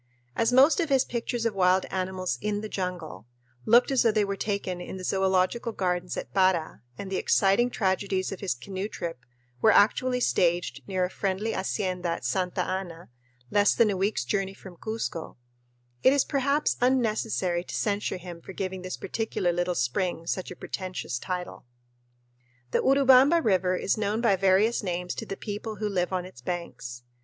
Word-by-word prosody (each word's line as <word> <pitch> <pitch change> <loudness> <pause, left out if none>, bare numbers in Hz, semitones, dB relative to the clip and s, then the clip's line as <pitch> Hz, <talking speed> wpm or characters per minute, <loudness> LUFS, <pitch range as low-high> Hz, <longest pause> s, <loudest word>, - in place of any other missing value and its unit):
As 230 +1 +2
most 270 +8 +6
of 330 -3 0
his 270 -2 +3
pictures 235 0 -3
of 230 - +1
wild 185 -1 +3
animals 185 -1 -2
"in 210 0 -1
the 215 - -5
jungle" 175 - -5 0.4
looked 240 +4 +5
as 265 - +3
though 230 - +4
they 210 -1 +2
were 200 0 -2
taken 195 -3 -3
in 190 - -7
the 185 - -8
zoölogical 190 +5 +1
gardens 180 -1 -1
at - - -6
Para, 185 - +2 0.2
and 195 -1 -7
the 190 - 0
exciting 200 +5 +3
tragedies 190 -3 -1
of 195 - -6
his 195 -9 -1
canoe 190 +9 -5
trip 170 - -5 0.4
were 220 - +6
actually 250 +5 +4
staged 175 - +1
near 185 -1 0
a - - -4
friendly 200 +3 -1
hacienda 185 -2 -2
at 165 -7 -3
Santa 180 +8 0
Ana, 180 -5 -5 0.4
less 205 0 +4
than 225 -3 +4
a - - -1
week's 190 - 0
journey 195 +6 -1
from 190 -3 -12
Cuzco, 220 -5 -5 0.6
it 260 - +6
is 280 -1 +3
perhaps 280 +1 +1
unnecessary 220 -8 +1
to - - -7
censure 205 -2 -1
him 175 -1 -9
for 190 - -10
giving 190 0 -4
this 185 0 -5
particular 220 -5 -1
little 175 +1 -1
spring 165 +7 -1
such 185 +2 -3
a 180 - -8
pretentious 185 -12 -5
title. 180 -7 -5 1.0
The - - +2
Urubamba 270 +3 +6
River 185 -3 +2
is 200 - 0
known 210 +1 0
by 230 -4 +3
various 195 +4 +3
names 180 -2 -3
to 225 - -6
the 195 - -5
people 215 +1 -5
who 210 0 -2
live 185 -3 -1
on 180 -1 -1
its 185 -10 -13
banks. 125 -6 -5
190 Hz, 180 wpm, -27 LUFS, 180-220 Hz, 1.0 s, most